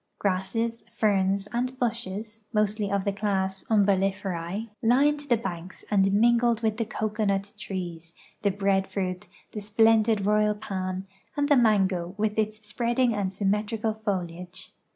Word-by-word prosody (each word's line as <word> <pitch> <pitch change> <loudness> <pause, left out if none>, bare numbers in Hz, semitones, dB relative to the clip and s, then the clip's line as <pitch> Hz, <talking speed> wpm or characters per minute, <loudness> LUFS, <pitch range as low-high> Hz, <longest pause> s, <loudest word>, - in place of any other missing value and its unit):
Grasses, 205 +4 -1
ferns, 195 -1 +1
and 250 +2 -1
bushes 220 -2 -3
(mostly 210 -2 0
of 200 -1 0
the 200 - +2
class 195 -2 -1
Umbellifer£e) 195 -1 0
lined 275 +5 +4
the 240 - +5
banks 185 -4 -6
and 195 -1 +4
mingled 235 +2 +3
with 220 -1 +1
the 230 - 0
cocoanut 205 -2 -1
trees, 170 -3 -6 0.3
the 205 - +3
breadfruit, 190 -2 -1 0.2
the 210 - -5
splendid 220 0 +3
royal 210 0 +3
palm, 190 -3 -4 0.3
and 285 0 +1
the 290 - +6
mango 195 -7 +2
with 215 0 0
its 215 0 -2
spreading 240 +2 +1
and 200 -3 -1
symmetrical 210 +3 0
foliage. 185 -4 -4
205 Hz, 130 wpm, -27 LUFS, 190-220 Hz, 0.3 s, the